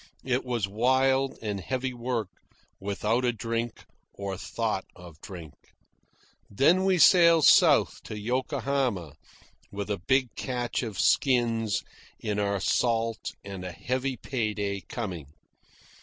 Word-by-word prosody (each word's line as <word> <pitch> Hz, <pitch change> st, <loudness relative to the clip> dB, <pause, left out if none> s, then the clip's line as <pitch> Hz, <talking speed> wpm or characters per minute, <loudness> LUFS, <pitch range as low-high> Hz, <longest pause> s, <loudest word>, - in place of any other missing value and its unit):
It 130 Hz, 0 st, 0 dB
was 120 Hz, -5 st, -1 dB
wild 130 Hz, +5 st, +2 dB
and 105 Hz, -2 st, -2 dB
heavy 130 Hz, +5 st, -3 dB
work, 120 Hz, -4 st, -3 dB, 0.5 s
without 105 Hz, +5 st, -1 dB
a 125 Hz, -, +3 dB
drink 115 Hz, 0 st, -4 dB, 0.3 s
or 100 Hz, -1 st, -4 dB
thought 105 Hz, 0 st, -3 dB
of 85 Hz, -4 st, -14 dB
drink. 85 Hz, -6 st, -9 dB, 1.0 s
Then 165 Hz, -, +3 dB
we 190 Hz, -1 st, +3 dB
sailed 170 Hz, -1 st, +6 dB
south -, -, +5 dB
to 110 Hz, -, -6 dB
Yokohama, 125 Hz, -, -1 dB, 0.6 s
with 100 Hz, +1 st, -4 dB
a 100 Hz, -, -1 dB
big 130 Hz, +5 st, +1 dB
catch 125 Hz, -2 st, -2 dB
of 110 Hz, -6 st, -5 dB
skins 115 Hz, -5 st, +2 dB, 0.4 s
in 105 Hz, -1 st, -2 dB
our 100 Hz, -1 st, 0 dB
salt 115 Hz, +1 st, 0 dB
and 100 Hz, -2 st, -7 dB
a 90 Hz, -, -5 dB
heavy 130 Hz, +6 st, -2 dB
pay 110 Hz, -4 st, -2 dB
day 100 Hz, -1 st, -2 dB
coming. 90 Hz, -, -5 dB
115 Hz, 125 wpm, -27 LUFS, 100-130 Hz, 1.0 s, sailed